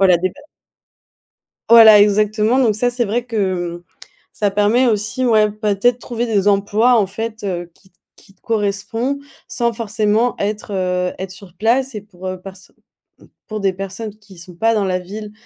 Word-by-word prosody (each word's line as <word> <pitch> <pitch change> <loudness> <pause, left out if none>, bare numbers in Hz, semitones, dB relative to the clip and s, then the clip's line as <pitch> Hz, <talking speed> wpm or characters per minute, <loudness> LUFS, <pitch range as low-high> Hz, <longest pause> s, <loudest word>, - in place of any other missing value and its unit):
Voilà 185 -2 +5
des 185 +2 -1
pe - - -21 1.4
Voilà, 225 -2 +9
exactement 210 +4 +2
donc 225 -5 +2
ça 245 +3 +1
c'est 240 -1 -1
vrai 230 +4 -1
que, 185 -7 -2
mmh, - - -27 0.5
ça 205 -2 0
permet 210 +6 +2
aussi, 220 +4 -1
ouais, 215 -3 +4
peut-être 210 +3 +1
trouver 240 -1 -4
des 205 -3 +1
emplois 205 +4 +3
en 200 - +1
fait, 225 +3 -6
heu, 175 -3 -4
qui 190 - -25
t 180 - -38 0.2
qui 195 - -20
te - - -40
correspond 225 +5 -2 0.3
sans 235 -1 -1
forcément 220 +1 0
être, 210 +1 -3
heu, 180 -1 -1
être 190 0 -5
sur 190 -2 -13
place 245 +7 +1
et 210 - -5
pour, 190 -3 -14
heu, 185 0 -5
perso 190 0 -12 0.7
pour 215 -1 -5
des 195 -1 +1
personnes 195 +3 -7
qui 205 -3 -17
sont 175 +1 -12
pas 225 +6 +2
dans 205 -2 +1
la 185 -1 -1
ville 210 +3 -8
210 Hz, 180 wpm, -18 LUFS, 195-225 Hz, 1.4 s, Voilà